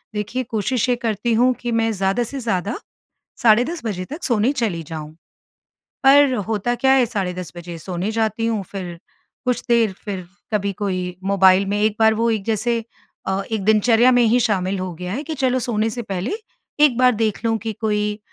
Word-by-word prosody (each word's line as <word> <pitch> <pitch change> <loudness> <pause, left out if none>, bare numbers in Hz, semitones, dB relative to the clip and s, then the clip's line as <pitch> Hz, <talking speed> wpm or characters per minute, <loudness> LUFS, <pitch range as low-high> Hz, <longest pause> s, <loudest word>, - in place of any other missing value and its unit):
देखिए 225 +5 -2
कोशिश 230 +2 -1
ये 245 - +3
करती 230 -1 -1
हूँ 250 +3 +4
कि 240 -1 -2
मैं 225 0 +1
ज़्यादा 195 +4 0
से 270 +4 -5
ज़्यादा 205 -3 -2 0.7
साढ़े 235 0 +5
10 335 +4 -5
बजे 185 -5 -3
तक 300 - -8
सोने 235 +2 +2
चली 220 - -2
जाऊँ। 155 -1 -7 0.9
पर 275 -1 +6
होता 225 +2 0
क्या 265 +3 +3
है 260 -3 +4
साढ़े 195 -5 -2
10 180 -1 -7
बजे 175 0 -7
सोने 180 +4 -3
जाती 225 0 0
हूँ 220 -3 -1
फ़िर 180 -4 -6 0.5
कुछ 250 -1 0
देर 230 -4 +3
फ़िर 190 -4 -4 0.3
कभी 200 -1 0
कोई 185 -3 -3
मोबाइल 195 0 +4
में 205 +1 -1
एक 215 0 +1
बार 220 0 +5
वो 230 +1 +1
एक 215 -3 -1
जैसे 230 +2 0 0.4
अ, 190 +1 0
एक 215 -3 -1
दिनचर्या 225 +4 +4
में 245 - +4
ही 235 +2 +3
शामिल 195 -3 0
हो 185 -1 -4
गया 180 +3 -6
है 270 - -3
कि 315 - -4
चलो 260 -3 +1
सोने 225 -2 0
से 240 +2 -5
पहले 195 -1 -3 0.5
एक 270 -5 +4
बार 250 0 +5
देख 220 0 -1
लूँ 225 -1 +2
कि 220 +1 -4
कोई 210 -1 0
220 Hz, 195 wpm, -21 LUFS, 195-240 Hz, 0.9 s, पर